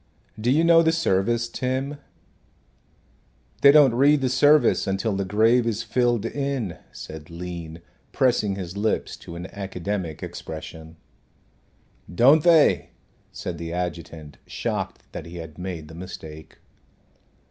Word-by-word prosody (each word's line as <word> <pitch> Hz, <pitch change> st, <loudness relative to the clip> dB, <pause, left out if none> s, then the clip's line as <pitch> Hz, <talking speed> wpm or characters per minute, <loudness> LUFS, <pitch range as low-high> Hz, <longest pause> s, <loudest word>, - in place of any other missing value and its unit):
Do 115 Hz, +3 st, 0 dB
you 150 Hz, +6 st, +3 dB
know 170 Hz, 0 st, +6 dB
the 160 Hz, -1 st, +3 dB
service, 115 Hz, -, +1 dB
Tim?" 130 Hz, +4 st, -3 dB, 1.6 s
"They 140 Hz, -, +9 dB
don't 145 Hz, -4 st, +6 dB
read 140 Hz, +4 st, +4 dB
the 130 Hz, -, +1 dB
service 145 Hz, +4 st, +4 dB
until 95 Hz, +2 st, -1 dB
the 100 Hz, -, -1 dB
grave 115 Hz, +5 st, +3 dB
is 115 Hz, 0 st, -1 dB
filled 120 Hz, -1 st, +1 dB
in," 135 Hz, -, -3 dB
said 75 Hz, -1 st, -10 dB
Lean, 85 Hz, -1 st, -8 dB, 0.3 s
pressing 120 Hz, -6 st, +1 dB
his 90 Hz, -1 st, -6 dB
lips 105 Hz, +2 st, -1 dB
to 85 Hz, -, -11 dB
an 85 Hz, +1 st, -6 dB
academic 95 Hz, -4 st, -4 dB
expression. 80 Hz, 0 st, -8 dB, 1.2 s
"Don't 135 Hz, -, +5 dB
they?" 165 Hz, -3 st, +4 dB, 0.4 s
said 85 Hz, -3 st, -6 dB
the 85 Hz, 0 st, -5 dB
adjutant, 85 Hz, -4 st, -6 dB
shocked -, -, -4 dB
that 80 Hz, -, -7 dB
he 85 Hz, -, -10 dB
had 80 Hz, -1 st, -9 dB
made 90 Hz, -4 st, -6 dB
the 80 Hz, -, -12 dB
mistake. 80 Hz, -3 st, -10 dB
100 Hz, 130 wpm, -24 LUFS, 85-130 Hz, 1.6 s, They